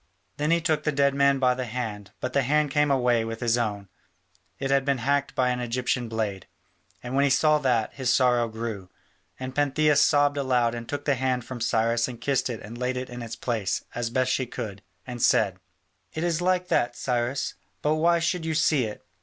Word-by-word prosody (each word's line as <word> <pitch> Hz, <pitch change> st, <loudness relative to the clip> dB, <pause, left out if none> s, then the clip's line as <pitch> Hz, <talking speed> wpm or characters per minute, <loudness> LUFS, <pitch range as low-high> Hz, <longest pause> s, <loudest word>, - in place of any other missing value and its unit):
Then 150 Hz, +1 st, 0 dB
he 170 Hz, +1 st, +4 dB
took 155 Hz, -3 st, +1 dB
the 150 Hz, -, +1 dB
dead 140 Hz, -1 st, +2 dB
man 140 Hz, 0 st, +3 dB
by 130 Hz, -1 st, +3 dB
the 125 Hz, 0 st, -4 dB
hand, 110 Hz, -4 st, -5 dB
but 125 Hz, 0 st, -4 dB
the 140 Hz, -, +3 dB
hand 150 Hz, +2 st, +1 dB
came 150 Hz, +1 st, +2 dB
away 125 Hz, -4 st, +2 dB
with 115 Hz, 0 st, -5 dB
his 120 Hz, -2 st, +2 dB
own: 105 Hz, -4 st, -2 dB, 0.7 s
it 135 Hz, 0 st, -2 dB
had 135 Hz, -1 st, +3 dB
been 140 Hz, -1 st, +1 dB
hacked 140 Hz, +3 st, 0 dB
by 125 Hz, -1 st, +2 dB
an 125 Hz, 0 st, -1 dB
Egyptian 125 Hz, 0 st, -1 dB
blade. 105 Hz, -4 st, -3 dB, 0.6 s
And 125 Hz, +1 st, -6 dB
when 140 Hz, +1 st, +3 dB
he 140 Hz, -, +3 dB
saw 150 Hz, +3 st, +4 dB
that, 120 Hz, -6 st, +1 dB
his 130 Hz, -3 st, 0 dB
sorrow 125 Hz, -2 st, +3 dB
grew, 110 Hz, -4 st, -6 dB, 0.5 s
and 130 Hz, 0 st, -5 dB
Pantheia 145 Hz, +2 st, +2 dB
sobbed 145 Hz, 0 st, +4 dB
aloud 125 Hz, -4 st, +1 dB
and 115 Hz, -1 st, -7 dB
took 145 Hz, 0 st, -4 dB
the 145 Hz, -, +3 dB
hand 130 Hz, -2 st, -1 dB
from 125 Hz, -2 st, -7 dB
Cyrus 115 Hz, 0 st, +1 dB
and 120 Hz, -2 st, -8 dB
kissed 135 Hz, +1 st, 0 dB
it 115 Hz, -3 st, -5 dB
and 115 Hz, +3 st, -9 dB
laid 125 Hz, 0 st, -1 dB
it 125 Hz, 0 st, -5 dB
in 120 Hz, 0 st, -7 dB
its 115 Hz, -1 st, -6 dB
place, 110 Hz, -7 st, -2 dB
as 120 Hz, -1 st, -2 dB
best 130 Hz, +1 st, +1 dB
she 130 Hz, -, 0 dB
could, 105 Hz, -6 st, -6 dB, 0.2 s
and 120 Hz, -1 st, -6 dB
said: 95 Hz, -5 st, +3 dB, 0.5 s
"It 160 Hz, -, -3 dB
is 170 Hz, -1 st, 0 dB
all 180 Hz, -, -1 dB
like 180 Hz, -1 st, +1 dB
that, 120 Hz, 0 st, +1 dB
Cyrus. 125 Hz, +2 st, -1 dB, 0.3 s
But 150 Hz, -, +2 dB
why 170 Hz, +2 st, +3 dB
should 170 Hz, +1 st, -1 dB
you 160 Hz, -1 st, -2 dB
see 150 Hz, -4 st, +3 dB
it?" 105 Hz, -, -8 dB
125 Hz, 220 wpm, -26 LUFS, 115-140 Hz, 0.7 s, he